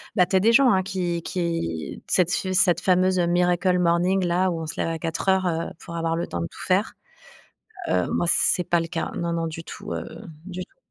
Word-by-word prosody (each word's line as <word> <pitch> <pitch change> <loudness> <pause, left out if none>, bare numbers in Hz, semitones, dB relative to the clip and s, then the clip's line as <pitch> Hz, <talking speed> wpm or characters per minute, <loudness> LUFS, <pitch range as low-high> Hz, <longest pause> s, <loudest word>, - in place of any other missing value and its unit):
bah, 180 - +5
tu - - -1
as 190 - +6
des 225 +4 +4
gens, 265 +1 +6
hein, 190 -1 +2
qui 180 -3 -2
qui 165 - -3
cette 180 -1 +2
f 185 - -1
cette 175 -2 +3
fameuse, 185 0 +3
heu, 175 - +3
miracle 180 +1 +2
morning 180 +2 +2
là, 180 +1 +1
où 165 - -3
on 160 - -5
se - - -6
lève - - 0
à 165 - -3
4:00, 185 +3 0
heu, 165 -1 -1
pour 170 -2 -9
avoir 165 0 -1
le 170 - -2
temps 85 - -4
de 85 - -2
tout - - -13
faire. - - +1 1.0
Heu, 90 -1 +1
moi, 175 - 0
c'est 180 - +3
pas 175 - +3
le 165 - -4
cas. 165 -1 -3
Non, 170 0 -2
non, 165 0 -1
du 160 0 -6
tout, - - -8
heu, - - -5 0.4
du 185 -1 -5
tout. - - -36
175 Hz, 235 wpm, -24 LUFS, 165-185 Hz, 1.0 s, as